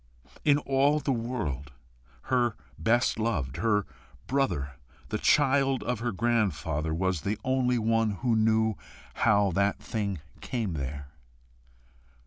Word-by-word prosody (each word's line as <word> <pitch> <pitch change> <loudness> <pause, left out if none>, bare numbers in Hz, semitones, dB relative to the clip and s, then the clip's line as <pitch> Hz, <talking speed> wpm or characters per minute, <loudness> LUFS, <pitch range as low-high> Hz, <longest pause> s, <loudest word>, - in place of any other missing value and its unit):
In 145 -1 +5
all 140 +1 +2
the 140 -1 -1
world, 105 - -3 0.5
her 120 -3 +1 0.2
best 115 +8 +2
loved, 80 - -1
her 105 +1 +1 0.4
brother, 125 - 0 0.4
the - - -2
child 135 -2 +3
of 125 -3 -2
her 120 +1 -1
grandfather, 90 -9 0
was 90 0 0
the 100 +2 -2
only 130 -1 +1
one 115 0 +2
who 120 -3 +3
knew 110 0 +3 0.4
how 105 -3 +3
that 100 +3 +1
thing 100 -5 -3 0.2
came 115 -8 -3
there. 70 -1 -5
110 Hz, 120 wpm, -28 LUFS, 95-125 Hz, 0.5 s, In